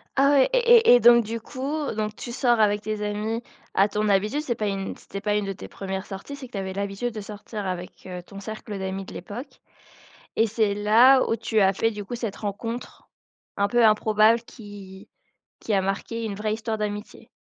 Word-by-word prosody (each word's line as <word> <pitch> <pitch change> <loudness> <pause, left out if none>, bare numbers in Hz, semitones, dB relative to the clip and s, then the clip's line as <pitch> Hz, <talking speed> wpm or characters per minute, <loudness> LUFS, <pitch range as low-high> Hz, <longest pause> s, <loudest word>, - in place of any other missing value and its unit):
Ah 275 +1 +4
ouais 275 -2 +5
et 475 - +6
et - - +10
et - - +5
donc 235 0 +7
du 230 +2 -4
coup, 280 +6 -4
donc 215 0 -2
tu 240 - -7
sors 240 -2 +2
avec 205 -1 +3
tes 215 -1 -4
amis 215 +3 -2 0.3
à 195 +2 +4
ton 210 +1 -1
habitude? 210 +9 +2
C'est 255 -6 -1
pas 210 -2 -2
une 195 -1 -3
c'était 200 - -8
pas 210 0 0
une 205 -1 0
de 195 - -3
tes - - -10
1res 190 -1 -5
sorties, 200 +9 -7
c'est 265 -2 -9
que - - -28
tu - - -4
avais 190 -1 -3
l'habitude 200 +4 -3
de 215 - -5
sortir 210 0 -7
avec, 180 0 -6
heu, 180 -1 -6
ton 195 +2 -11
cercle 215 0 -7
d'amis 190 0 -4
de - - -11
l'époque? 245 - -8 0.8
Et 225 - +4
c'est 215 -1 +1
là 230 +6 +5
où 225 - +2
tu 225 -1 0
as 195 0 +4
fait 225 +4 +1
du 205 -1 -7
coup 240 - -5
cette 225 -4 -4
rencontre 230 +4 -6 0.5
un 200 0 +2
peu 240 +2 +3
improbable 215 +1 +4
qui 200 -5 -12 0.5
qui 215 - -3
a 195 - +3
marquée 195 +4 -3
une 205 -2 -4
vraie 215 +1 -2
histoire 220 0 -3
d'amitié? 210 0 -5
215 Hz, 215 wpm, -25 LUFS, 200-235 Hz, 0.8 s, et